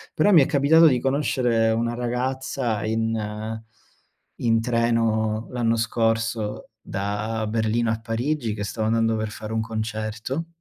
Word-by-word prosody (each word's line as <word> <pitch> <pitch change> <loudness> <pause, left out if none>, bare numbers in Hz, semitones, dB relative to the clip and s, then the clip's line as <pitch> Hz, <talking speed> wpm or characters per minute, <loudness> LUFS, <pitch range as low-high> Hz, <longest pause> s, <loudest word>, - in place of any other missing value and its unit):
Però 205 +7 +4
mi 165 -6 +8
è - - +3
capitato 160 +4 +5
di 125 -4 +3
conoscere 125 -4 +1
1 115 +1 0
ragazza, 125 -1 -2
in 110 0 -2 0.8
in 115 -1 +2
treno 115 -2 +1
l'anno 115 -2 +1
scorso 115 -1 -1
da 105 +3 -3
Berlino 110 +1 0
a 115 - -2
Parigi, 115 +1 -2
che 105 -1 -4
stava 110 +1 -2
andando 115 0 +2
per 110 0 -2
fare 110 +1 -7
un 110 - 0
concerto 110 +6 -4
115 Hz, 135 wpm, -24 LUFS, 110-120 Hz, 0.8 s, mi